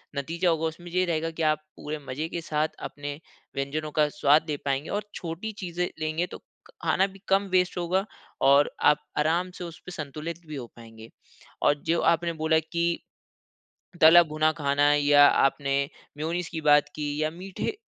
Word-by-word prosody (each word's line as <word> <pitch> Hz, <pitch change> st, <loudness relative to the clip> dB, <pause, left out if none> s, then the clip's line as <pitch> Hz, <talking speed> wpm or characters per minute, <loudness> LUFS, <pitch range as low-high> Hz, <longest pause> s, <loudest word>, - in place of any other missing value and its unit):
नतीजा 165 Hz, +6 st, 0 dB
होगा, 165 Hz, -1 st, +1 dB
उसमें 175 Hz, +2 st, -8 dB
ये 185 Hz, +1 st, +2 dB
रहेगा 165 Hz, -2 st, -1 dB
कि 160 Hz, 0 st, -4 dB
आप 155 Hz, -1 st, +2 dB, 0.2 s
पूरे 150 Hz, +1 st, -5 dB
मज़े 145 Hz, +5 st, -3 dB
के 170 Hz, -, -4 dB
साथ, 155 Hz, -1 st, 0 dB
अपने 145 Hz, 0 st, -6 dB, 0.4 s
व्यंजनों 150 Hz, +3 st, -3 dB
का 150 Hz, 0 st, +3 dB
स्वाद 150 Hz, +2 st, +3 dB
ले 150 Hz, -, -1 dB
पाएँगे। 140 Hz, +2 st, -1 dB
और 205 Hz, 0 st, -3 dB
छोटी 170 Hz, +6 st, -5 dB
चीज़ें 175 Hz, 0 st, -2 dB
लेंगे 155 Hz, +3 st, -1 dB
तो -, -, -9 dB
क -, -, -42 dB, 0.4 s
खाना 190 Hz, -, +3 dB
भी 195 Hz, 0 st, -15 dB
कम 195 Hz, +1 st, +4 dB
वेस्ट 180 Hz, 0 st, +2 dB
होगा 180 Hz, +2 st, 0 dB, 0.4 s
और 140 Hz, +2 st, +5 dB, 0.2 s
आप 150 Hz, 0 st, +4 dB
आराम 170 Hz, +4 st, +1 dB
से -, -, -6 dB
उसपे 170 Hz, +1 st, -9 dB
संतुलित 155 Hz, +1 st, -6 dB
भी 155 Hz, -, -6 dB
हो 130 Hz, -3 st, -5 dB
पाएँगे। 115 Hz, -1 st, -13 dB, 0.5 s
और -, -, +5 dB
जो 165 Hz, +1 st, +2 dB
आपने 170 Hz, 0 st, +2 dB
बोला 160 Hz, 0 st, +2 dB
कि, 170 Hz, +2 st, -1 dB, 1.0 s
तला-भुना 155 Hz, -1 st, +6 dB
खाना 145 Hz, -1 st, +2 dB
या 145 Hz, 0 st, +6 dB
आपने 140 Hz, 0 st, +2 dB, 0.4 s
मेयोनीज़ 170 Hz, +3 st, -2 dB
की 165 Hz, -3 st, -4 dB
बात 150 Hz, -1 st, +5 dB
की, 150 Hz, 0 st, -3 dB
या 155 Hz, -, +1 dB
मीठे 185 Hz, -, -5 dB
155 Hz, 175 wpm, -26 LUFS, 145-170 Hz, 1.0 s, तला-भुना